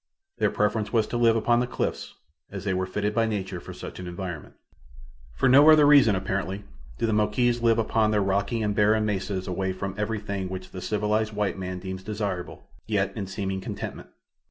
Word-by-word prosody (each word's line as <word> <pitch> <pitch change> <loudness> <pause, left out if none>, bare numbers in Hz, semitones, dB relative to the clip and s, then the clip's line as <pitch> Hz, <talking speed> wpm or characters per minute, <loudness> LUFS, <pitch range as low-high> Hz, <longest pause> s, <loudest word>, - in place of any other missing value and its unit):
Their - - +3
preference 105 0 0
was 115 -3 +2
to - - -4
live 115 -1 +4
upon 120 +1 +2
the 125 - 0
cliffs, - - -3 0.3
as 95 -1 -7
they 100 -2 0
were 95 0 -1
fitted 105 +2 -2
by 115 0 +2
nature 95 -4 -3
for - - -10
such - - -8
an 90 - -6
environment. 85 -3 -6 0.8
For 65 - +2
no 140 +4 +7
other 155 -1 +7
reason, 140 -8 +6
apparently, 95 +1 -3 0.3
do - - 0
the 110 - +1
Moquis 120 +3 +1
live 115 -1 +3
upon 110 -1 +2
their 105 -1 +2
rocky 100 +4 0
and 105 -1 0
barren 105 +1 +3
mesas 95 -2 -2
away 95 +1 -1
from 95 +1 -4
everything 105 -3 -3
which 95 0 -7
the 95 - -7
civilized 105 +2 0
white 105 -2 -1
man 90 0 -4
deems 95 0 -6
desirable, 100 -4 -4 0.2
yet, - - 0
in 100 - -4
seeming 95 0 -3
contentment. - - -6
105 Hz, 195 wpm, -26 LUFS, 95-110 Hz, 0.8 s, no